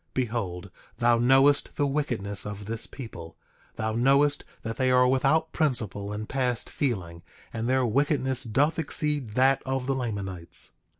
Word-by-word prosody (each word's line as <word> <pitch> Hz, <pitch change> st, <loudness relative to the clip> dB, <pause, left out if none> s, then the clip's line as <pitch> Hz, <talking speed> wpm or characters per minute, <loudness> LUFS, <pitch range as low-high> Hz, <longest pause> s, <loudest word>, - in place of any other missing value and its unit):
Behold, 100 Hz, -8 st, -3 dB, 0.3 s
thou 120 Hz, 0 st, +3 dB
knowest 135 Hz, +4 st, +4 dB
the 145 Hz, -, +1 dB
wickedness 120 Hz, -9 st, -1 dB
of 105 Hz, 0 st, -7 dB
this 115 Hz, +2 st, -4 dB
people; 85 Hz, -11 st, -9 dB, 0.4 s
thou 110 Hz, 0 st, -2 dB
knowest 140 Hz, +5 st, +3 dB, 0.2 s
that 115 Hz, 0 st, -5 dB
they 130 Hz, -1 st, +2 dB
are 125 Hz, 0 st, +5 dB
without 135 Hz, +5 st, +2 dB
principle, 110 Hz, -, -1 dB
and 105 Hz, +1 st, -5 dB
past 125 Hz, -3 st, -1 dB
feeling; 90 Hz, -11 st, -3 dB, 0.3 s
and 115 Hz, +1 st, -2 dB
their 130 Hz, -1 st, +2 dB
wickedness 130 Hz, +1 st, +1 dB
doth 145 Hz, +8 st, +1 dB
exceed 145 Hz, -6 st, -1 dB
that 130 Hz, +3 st, +3 dB
of 130 Hz, -1 st, -2 dB
the 135 Hz, -, 0 dB
Lamanites. 100 Hz, -9 st, -2 dB
125 Hz, 145 wpm, -26 LUFS, 105-135 Hz, 0.4 s, are